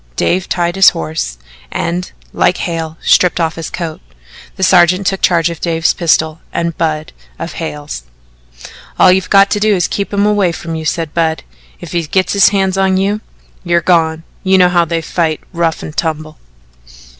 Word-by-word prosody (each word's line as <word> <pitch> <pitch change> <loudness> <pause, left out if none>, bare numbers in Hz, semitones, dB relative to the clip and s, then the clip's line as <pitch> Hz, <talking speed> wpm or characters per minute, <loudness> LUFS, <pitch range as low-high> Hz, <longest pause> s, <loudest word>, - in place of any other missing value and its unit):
Dave 185 - 0
tied 175 0 0
his 195 - +8
horse 65 -7 -4 0.3
and, 180 +2 -3 0.2
like 180 0 +2
Hale, 165 -2 -4
stripped 180 -1 +3
off 165 -1 0
his 165 -1 -6
coat. 165 -3 -5 0.5
The 190 - -4
sergeant 185 +1 +4
took 195 0 -1
charge 170 -1 +2
of 165 - -9
Dave's 165 -1 +1
pistol 160 -2 +1
and 170 0 -2
Budd 155 -2 -2 0.2
of 165 - -6
Hale's. 150 - -5 1.0
"All - - +6
you've 185 0 +1
got 200 0 +5
to 205 - +1
do 210 0 +3
is 180 - 0
to - - -1
keep 200 - -3
him 200 0 +1
away 205 -4 +2
from 165 0 -6
you," 160 -1 -4
said 160 0 -2
Budd. 160 -1 0 0.4
"If 175 -3 -9
he 170 - 0
gets 185 +4 0
his 200 -1 +5
hands 195 -1 0
on 190 -1 +2
you 200 +3 0 0.4
you're 170 -1 +2
gone. 165 -2 +1 0.2
You 190 0 +3
know 180 -1 +5
how 175 -1 +2
they 165 0 -2
fight 160 -2 -1
rough 170 -2 -1
and 155 - -8
tumble." 155 -1 -3
170 Hz, 185 wpm, -14 LUFS, 160-185 Hz, 1.0 s, his